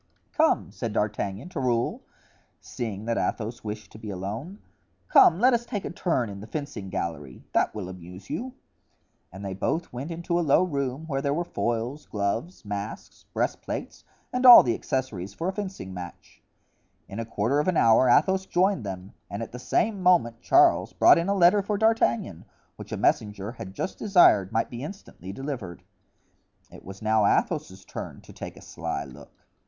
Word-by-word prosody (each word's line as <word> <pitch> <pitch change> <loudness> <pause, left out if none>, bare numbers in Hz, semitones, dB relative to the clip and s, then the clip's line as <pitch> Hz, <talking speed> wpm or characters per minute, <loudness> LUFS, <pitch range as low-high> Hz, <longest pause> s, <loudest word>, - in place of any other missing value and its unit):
"Come," - - +2
said 115 -2 -4
D'Artagnan 105 - -2
to 180 - -5
Raoul, 120 -3 0 0.6
seeing 110 -3 -6
that 115 0 0
Athos 115 +2 -3
wished 105 0 -6
to 110 - -12
be 110 -2 -7
alone, 105 - -5 0.5
"come, 170 - +6
let 250 +3 +5
us 235 0 +1
take 210 -4 -5
a - - -4
turn 165 -9 0
in 100 -1 -8
the 105 - -9
fencing 145 -10 -5
gallery; 75 -8 -5
that - - +1
will 100 -4 -5
amuse 90 +1 -10
you." 255 +2 -5 0.8
And 95 +3 -9
they 95 - -3
both 160 - -2
went 130 +6 -5
into 170 +1 -1
a - - +2
low 155 +2 +4
room 140 -3 -2
where 135 -4 -2
there 140 0 0
were 170 - 0
foils, 120 +2 -3
gloves, 110 - -3
masks, 100 +1 -6
breastplates, - - -3 0.3
and 250 +1 -1
all 245 -2 +11
the 120 - +1
accessories 100 -9 -3
for 165 - -3
a - - -3
fencing 190 - -6
match. 90 -1 -10 0.7
In 100 - -7
a - - -1
quarter 115 +5 0
of 150 - 0
an 180 -3 +2
hour 115 +3 +5
Athos 190 +9 +3
joined 185 - +2
them 95 -1 -7 0.2
and 100 +3 -4
at - - -8
the 125 - -8
same 200 - 0
moment 145 -11 +3
Charles - - +4
brought - - +6
in 170 +3 -1
a 200 - +2
letter 185 +2 +5
for 205 +1 -2
D'Artagnan, 120 - +1 0.3
which - - -11
a - - -2
messenger 105 -1 0
had 95 -5 -9
just - - -4
desired 175 - +5
might 115 - 0
be 120 0 -6
instantly 150 - -9
delivered. 120 - -6 0.9
It - - -13
was 100 +3 -10
now 110 -1 +3
Athos's 95 -1 -1
turn - - -7
to - - -15
take - - -8
a - - -13
sly - - -4
look. 70 +1 -15
120 Hz, 180 wpm, -26 LUFS, -, 0.9 s, all